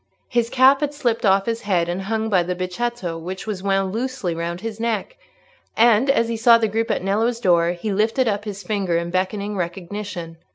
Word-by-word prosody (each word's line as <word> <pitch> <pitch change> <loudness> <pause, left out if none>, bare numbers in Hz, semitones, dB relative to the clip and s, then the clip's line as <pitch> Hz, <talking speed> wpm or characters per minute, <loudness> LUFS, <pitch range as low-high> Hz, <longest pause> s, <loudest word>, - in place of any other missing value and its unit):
His 235 -1 +1
cap 265 +2 +5
had 295 0 -1
slipped 235 -5 0
off 195 0 +3
his 230 0 -2
head, 180 -4 +1
and 175 +2 -2
hung 220 +3 -2
by 195 -5 +3
the 180 +1 -2
becchetto 185 -1 -3
which 185 +3 -6
was 210 -4 -4
wound 195 -1 0
loosely 250 -6 -2
round 170 +1 -4
his 225 -1 -5
neck; 230 - -2 0.6
and 235 +3 +4
as 230 -4 +3
he 230 - -2
saw 230 +1 +6
the 225 -1 +1
group 225 +2 -1
at - - -1
Nello's 225 +5 0
door 175 -5 +3
he 200 +4 -3
lifted 225 +5 +1
up 205 -1 -1
his 200 -2 -6
fingers 185 -3 0
in 170 0 -5
beckoning 200 +3 -2
recognition. 175 -1 -5
205 Hz, 205 wpm, -22 LUFS, 180-230 Hz, 0.6 s, saw